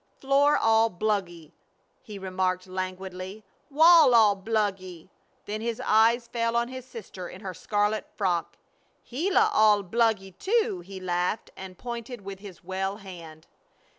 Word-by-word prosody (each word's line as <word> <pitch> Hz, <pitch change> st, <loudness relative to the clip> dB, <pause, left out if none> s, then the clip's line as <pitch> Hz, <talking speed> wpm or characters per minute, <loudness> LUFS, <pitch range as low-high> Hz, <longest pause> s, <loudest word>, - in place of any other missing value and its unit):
"Floor 280 Hz, +2 st, +3 dB
all 225 Hz, 0 st, +3 dB
bluggy!" 180 Hz, -5 st, -3 dB, 0.5 s
he 215 Hz, -5 st, -10 dB
remarked, 185 Hz, -1 st, -2 dB
languidly. 185 Hz, +2 st, -6 dB, 0.2 s
"Wall 315 Hz, -2 st, +6 dB
all 215 Hz, -3 st, +6 dB
bluggy!" 190 Hz, -4 st, -3 dB, 0.4 s
Then 215 Hz, +1 st, -4 dB
his 230 Hz, 0 st, -3 dB
eyes 230 Hz, +2 st, +3 dB
fell 230 Hz, 0 st, -1 dB
on 235 Hz, +1 st, 0 dB
his 255 Hz, -1 st, -8 dB
sister 190 Hz, -7 st, -9 dB
in 185 Hz, -, -11 dB
her 190 Hz, -3 st, -6 dB
scarlet 205 Hz, +3 st, -1 dB
frock. 175 Hz, -5 st, -1 dB, 0.5 s
"Gila 390 Hz, -, +2 dB
all 210 Hz, -, +4 dB
bluggy, 210 Hz, -1 st, 0 dB
too!" 425 Hz, -, +1 dB
he 190 Hz, +1 st, -9 dB
laughed, 180 Hz, +3 st, -2 dB
and 190 Hz, -1 st, -10 dB
pointed 235 Hz, -1 st, -7 dB
with 195 Hz, -1 st, -8 dB
his 195 Hz, -4 st, -12 dB
well 190 Hz, +2 st, -3 dB
hand. 170 Hz, -6 st, -11 dB
205 Hz, 135 wpm, -26 LUFS, 185-235 Hz, 0.5 s, Wall